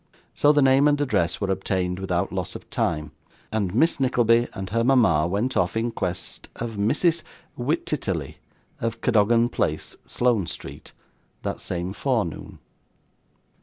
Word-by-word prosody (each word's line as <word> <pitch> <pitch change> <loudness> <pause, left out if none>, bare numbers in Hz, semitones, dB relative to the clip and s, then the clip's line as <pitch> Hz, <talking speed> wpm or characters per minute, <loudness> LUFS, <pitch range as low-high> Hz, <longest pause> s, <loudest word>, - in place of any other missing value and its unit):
So, 145 - +4
the 145 -2 +4
name 135 +2 +5
and 145 -1 +2
address 125 -12 0
were 100 -2 -1
obtained 90 -1 -1
without 95 0 -1
loss 95 -2 -3
of - - -9
time, 75 -1 -1 0.4
and 105 -4 0
Miss 160 +4 +3
Nickleby 120 -2 +3
and 95 -2 -6
her 115 +1 +1
mama 110 - +4
went 105 +8 -1
off 90 +5 +1
in 115 +1 0
quest 90 -5 -4
of 115 0 -4
Mrs. 150 - +1 0.3
Wititterly, 120 - -2 0.4
of 115 0 -3
Cadogan 115 +3 +3
Place, 80 -10 -2
Sloane 120 -8 +1
Street, - - -8 0.5
that - - -3
same 90 +1 -3
forenoon. 115 - -2
110 Hz, 140 wpm, -24 LUFS, 90-125 Hz, 0.5 s, name